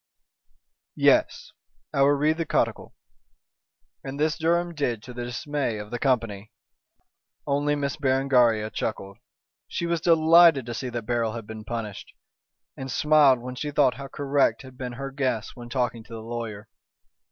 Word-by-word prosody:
"Yes! -, -, +2 dB, 0.4 s
I 140 Hz, -, +1 dB
will 140 Hz, +1 st, +5 dB
read 150 Hz, +3 st, +1 dB
the 165 Hz, -, -1 dB
codicil!" -, -, -1 dB, 1.1 s
and 135 Hz, +1 st, -6 dB
this 155 Hz, +1 st, +1 dB
Durham 170 Hz, +1 st, 0 dB
did 120 Hz, -8 st, -2 dB
to 125 Hz, -, -10 dB
the 120 Hz, 0 st, -5 dB
dismay 130 Hz, -1 st, -3 dB
of 105 Hz, 0 st, -8 dB
the 120 Hz, -, -3 dB
company. 115 Hz, -6 st, -1 dB, 0.9 s
Only 145 Hz, +1 st, +1 dB
Miss 140 Hz, -1 st, -2 dB
Berengaria 130 Hz, -6 st, +2 dB
chuckled. 100 Hz, -3 st, -4 dB, 0.5 s
She 170 Hz, -, -3 dB
was 170 Hz, -1 st, -1 dB
delighted 165 Hz, -4 st, +6 dB
to 120 Hz, -, -5 dB
see 125 Hz, +2 st, -4 dB
that 120 Hz, -1 st, -4 dB
Beryl 115 Hz, -1 st, 0 dB
had 115 Hz, -2 st, -6 dB
been 110 Hz, 0 st, -9 dB
punished, 105 Hz, -2 st, -6 dB, 0.6 s
and 135 Hz, 0 st, -7 dB
smiled 150 Hz, -4 st, +4 dB
when 125 Hz, +1 st, -6 dB
she 150 Hz, +4 st, -4 dB
thought 145 Hz, -3 st, +3 dB
how 135 Hz, +4 st, -8 dB
correct 140 Hz, 0 st, 0 dB
had 130 Hz, -1 st, -13 dB
been 125 Hz, -1 st, -6 dB
her 135 Hz, +2 st, -6 dB
guess 130 Hz, -6 st, -2 dB
when 120 Hz, -1 st, -10 dB
talking 120 Hz, -2 st, -2 dB
to 115 Hz, -, -12 dB
the 110 Hz, -1 st, -7 dB
lawyer. 115 Hz, -2 st, -6 dB
130 Hz, 160 wpm, -25 LUFS, 115-145 Hz, 1.1 s, delighted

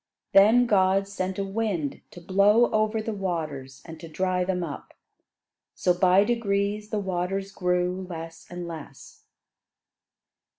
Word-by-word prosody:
Then 220 Hz, +5 st, +6 dB
God 195 Hz, -2 st, +3 dB
sent 190 Hz, -1 st, -4 dB
a 200 Hz, -, -1 dB
wind 195 Hz, -7 st, -2 dB
to -, -, -12 dB
blow 200 Hz, +7 st, +3 dB
over 215 Hz, 0 st, +1 dB
the 225 Hz, -, -3 dB
waters, 155 Hz, -9 st, -4 dB
and 160 Hz, -1 st, -10 dB
to 165 Hz, -, -9 dB
dry 180 Hz, +3 st, -1 dB
them 180 Hz, -1 st, -1 dB
up; 150 Hz, -4 st, -8 dB, 0.8 s
so 180 Hz, -, +2 dB
by 185 Hz, +2 st, +4 dB
degrees 210 Hz, -2 st, -1 dB
the 215 Hz, -, -2 dB
waters 195 Hz, 0 st, -2 dB
grew 180 Hz, 0 st, -1 dB
less 165 Hz, -1 st, -8 dB
and 175 Hz, -1 st, -6 dB
less. 155 Hz, -5 st, -11 dB
190 Hz, 135 wpm, -26 LUFS, 175-200 Hz, 0.8 s, Then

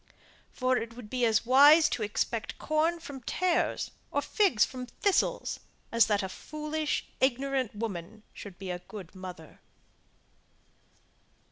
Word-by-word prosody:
For 255 Hz, 0 st, +1 dB
it 230 Hz, 0 st, -5 dB
would 235 Hz, -4 st, -11 dB
be 250 Hz, -1 st, +1 dB
as 225 Hz, 0 st, +2 dB
wise 290 Hz, +5 st, +7 dB
to 240 Hz, -, -2 dB
expect 215 Hz, +2 st, -2 dB
corn 320 Hz, +2 st, +1 dB
from 285 Hz, -5 st, -9 dB
tares, 355 Hz, +8 st, 0 dB, 0.2 s
or -, -, -1 dB
figs 390 Hz, -, +3 dB
from 255 Hz, -1 st, -7 dB
thistles, 400 Hz, +9 st, 0 dB, 0.3 s
as 230 Hz, 0 st, +5 dB
that 205 Hz, -2 st, +1 dB
a -, -, -2 dB
foolish 305 Hz, +8 st, -3 dB
ignorant 265 Hz, -2 st, 0 dB
woman 210 Hz, -1 st, -5 dB
should 195 Hz, -4 st, -10 dB
be 190 Hz, -2 st, -5 dB
a 175 Hz, -, -4 dB
good 185 Hz, -1 st, -10 dB
mother. 180 Hz, -4 st, -10 dB
245 Hz, 135 wpm, -29 LUFS, 210-295 Hz, 0.3 s, wise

